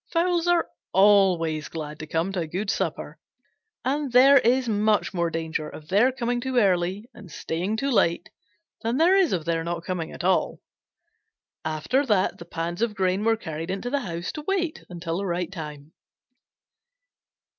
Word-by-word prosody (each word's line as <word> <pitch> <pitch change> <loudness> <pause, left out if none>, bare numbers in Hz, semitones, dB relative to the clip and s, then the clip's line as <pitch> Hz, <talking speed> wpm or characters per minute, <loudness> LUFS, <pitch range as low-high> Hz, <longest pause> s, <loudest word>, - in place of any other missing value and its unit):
Fowls 345 0 +1
are 350 -1 +3 0.3
always 185 -6 +4
glad 150 -2 -6
to 155 - -7
come 165 +5 -1
to 190 - -2
a 165 - -2
good 195 +6 -2
supper, - - -3 0.7
and 280 +1 -1
there 270 +3 +7
is 250 +1 +2
much 215 -1 +1
more 170 -2 0
danger 160 -2 -3
of 155 +1 -12
their 210 +7 +4
coming 245 -1 -2
too 260 0 -2
early 190 0 +1
and 195 -6 -13
staying 180 +8 -3
too 275 +4 -1
late 170 -7 +2 0.5
than 230 +3 -1
there 340 +5 +5
is 380 -4 +3
of 170 -4 -1
their 165 -1 0
not 170 0 -4
coming 175 -3 -3
at - - -8
all. 185 0 +1 1.0
After 155 - 0
that 200 -4 +1
the 170 - -9
pans 170 +2 -4
of 230 -3 0
grain 190 +1 0
were 225 0 +3
carried 160 -3 -6
into 195 +6 -3
the 285 - +1
house 175 -5 -4
to 305 - -6
wait 360 -5 -1
until 170 -1 -4
the 200 - -3
right 175 0 -2
time. 150 -4 -8
190 Hz, 175 wpm, -25 LUFS, 165-245 Hz, 1.0 s, there